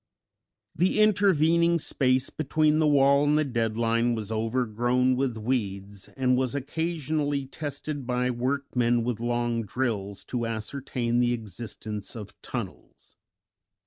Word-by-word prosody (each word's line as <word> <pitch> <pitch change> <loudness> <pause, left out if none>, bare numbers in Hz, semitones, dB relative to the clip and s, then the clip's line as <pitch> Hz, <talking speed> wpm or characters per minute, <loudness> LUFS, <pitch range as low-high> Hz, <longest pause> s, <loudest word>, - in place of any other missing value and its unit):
The 185 +5 +2
intervening 170 -5 +4
space 130 -3 +1
between 155 +1 +1
the 155 - +3
wall 140 -1 +5
and 145 +1 +3
the 155 - +3
dead 115 -5 -1
line 115 +1 +2
was 110 -1 -5
overgrown 120 +2 +1
with 125 -3 -1
weeds, 100 -4 -3
and 125 -1 +3
was 130 0 0
occasionally 150 -1 -1
tested 145 -1 -5
by 125 0 +1
workmen 125 -2 0
with 120 -2 -2
long 120 0 0
drills 105 -3 -3
to 120 -2 -3
ascertain 120 +1 -2
the 120 0 +3
existence 110 -1 -6
of 105 -3 -8
tunnels. - - -8
125 Hz, 125 wpm, -27 LUFS, 115-145 Hz, -, wall